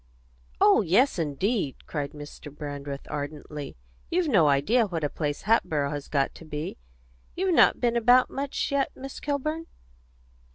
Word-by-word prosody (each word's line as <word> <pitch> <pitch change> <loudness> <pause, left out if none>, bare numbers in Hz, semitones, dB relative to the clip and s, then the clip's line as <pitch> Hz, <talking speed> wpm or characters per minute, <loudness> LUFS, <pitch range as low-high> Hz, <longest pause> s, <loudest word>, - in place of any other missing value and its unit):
"Oh - - +6
yes, 200 - +3
indeed!" 160 - -1
cried 145 -1 -4
Mr. 145 0 -10
Brandreth 145 -1 -6
ardently. 150 - -6 0.3
"You've 350 0 +1
no 180 - +5
idea 205 - +3
what 165 -4 -3
a 145 - 0
place 145 -2 -3
Hatboro' 155 -10 +2
has 145 -1 -5
got 140 -2 0
to - - -12
be. 150 - -5 0.6
You've 370 0 +1
not - - +5
been 240 -1 +1
about 245 +2 +5
much 275 +1 -2
yet, 280 -1 +1
Miss 270 0 -8
Kilburn?" 305 +3 -2
165 Hz, 150 wpm, -27 LUFS, -, 0.6 s, Oh